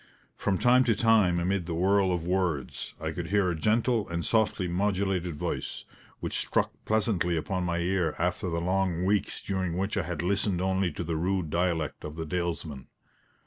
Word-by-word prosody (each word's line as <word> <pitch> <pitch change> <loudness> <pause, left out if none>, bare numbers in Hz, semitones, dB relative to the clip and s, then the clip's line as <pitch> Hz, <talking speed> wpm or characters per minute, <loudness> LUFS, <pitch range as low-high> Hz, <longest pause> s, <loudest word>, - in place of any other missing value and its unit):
From 95 - 0
time 125 +3 +5
to 115 - +3
time, 105 -6 +4
amid 90 0 0
the 85 - -2
whirl 95 +2 +3
of 90 -2 -1
words, 90 -6 -1
I 80 0 -3
could 85 +1 -4
hear 100 -1 +2
a - - -2
gentle 110 +5 +1
and 85 0 -2
softly 110 -4 +1
modulated 95 -2 0
voice, - - -4 0.4
which - - -2
struck - - 0
pleasantly 100 -6 +1
upon 90 +3 -2
my 85 -1 0
ear 85 -2 0
after 90 +2 -1
the 85 0 -1
long 90 -1 0
weeks 100 +1 0
during 95 -3 -2
which 100 +3 -1
I - - +3
had 85 0 -4
listened 100 0 +1
only 95 -1 +1
to 85 - -4
the 85 -1 -2
rude 90 -1 -1
dialect 85 -3 -1
of 75 0 -6
the 80 0 -4
dalesmen. 80 -4 -3
90 Hz, 185 wpm, -28 LUFS, 85-100 Hz, 0.4 s, time